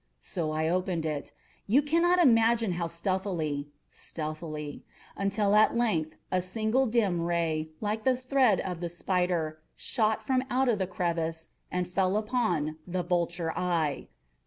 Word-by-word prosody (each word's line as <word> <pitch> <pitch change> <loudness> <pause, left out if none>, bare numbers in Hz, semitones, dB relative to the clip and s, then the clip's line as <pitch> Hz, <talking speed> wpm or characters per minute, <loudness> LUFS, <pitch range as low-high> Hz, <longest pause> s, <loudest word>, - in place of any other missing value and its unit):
So 165 -4 -3
I 155 +1 0
opened 180 -1 0
it—you 180 - -1
cannot 335 +4 +3
imagine 230 - +4
how 170 -1 -1
stealthily, 170 -4 -2 0.2
stealthily—until, 155 +6 -4
at 215 +2 +5
length 170 -10 0 0.2
a 185 - +2
simple 220 +8 +1
dim 210 -7 +1
ray, 165 -2 0
like 215 +1 -1
the 260 -1 +3
thread 255 -5 +3
of 180 -3 -4
the 175 0 -3
spider, 175 -3 -1 0.2
shot 220 -3 0
from 260 -2 +2
out 255 -2 +2
the 190 -2 -1
crevice 165 -3 -2 0.2
and 180 -1 -1
fell 185 +1 +1
full - - +2
upon 210 -10 0
the 180 0 -1
vulture 170 -1 0
eye. 165 -6 0
180 Hz, 135 wpm, -29 LUFS, 165-220 Hz, 0.2 s, at